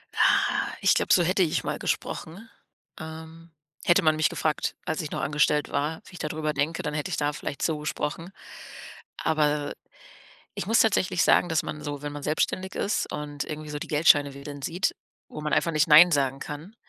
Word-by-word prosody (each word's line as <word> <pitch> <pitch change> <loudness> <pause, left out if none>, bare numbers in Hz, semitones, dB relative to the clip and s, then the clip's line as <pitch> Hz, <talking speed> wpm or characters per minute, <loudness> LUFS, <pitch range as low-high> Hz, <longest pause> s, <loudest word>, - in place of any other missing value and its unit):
Ah, - - +2
ich - - +5
glaube, - - +2
so 175 - +5
hätte 185 +2 +2
ich 160 - 0
mal - - -3
gesprochen, 195 +8 -4 0.5
ähm. 160 +1 -10 0.3
Hätte 175 -3 +5
man 155 0 +3
mich 155 - +3
gefragt, 155 -1 -2
als 160 - -3
ich 155 - -5
noch - - -4
angestellt 150 +1 +1
war, 155 +3 -2
wie - - -15
ich 180 - -10
da 150 - -2
drüber 155 0 -2
denke, 155 +3 -1
dann 150 - -3
hätte 150 -1 -3
ich - - -1
da 145 0 0
vielleicht 145 - -6
so 160 -2 0
gesprochen. 155 +3 -4 0.9
Aber 150 -2 0 0.8
ich - - -4
muss 225 +3 +3
tatsächlich 185 -5 +2
sagen, 175 - +4
dass 160 - +1
man 150 - -6
so, 145 -1 -5
wenn 145 0 -5
man 145 - -7
selbstständig 185 +5 -1
ist 205 - -1
und 145 -1 -4
irgendwie 155 0 -7
so 150 - -4
die - - -6
Geldscheine 145 -2 +4
wedeln 140 +1 -9
sieht, 175 +7 -1 0.3
wo 150 - -8
man 150 0 -3
einfach 165 - +2
nicht 155 +1 +2
nein 165 +4 +9
sagen 135 -1 +1
kann. 155 +10 -8
155 Hz, 200 wpm, -26 LUFS, 145-165 Hz, 0.9 s, nein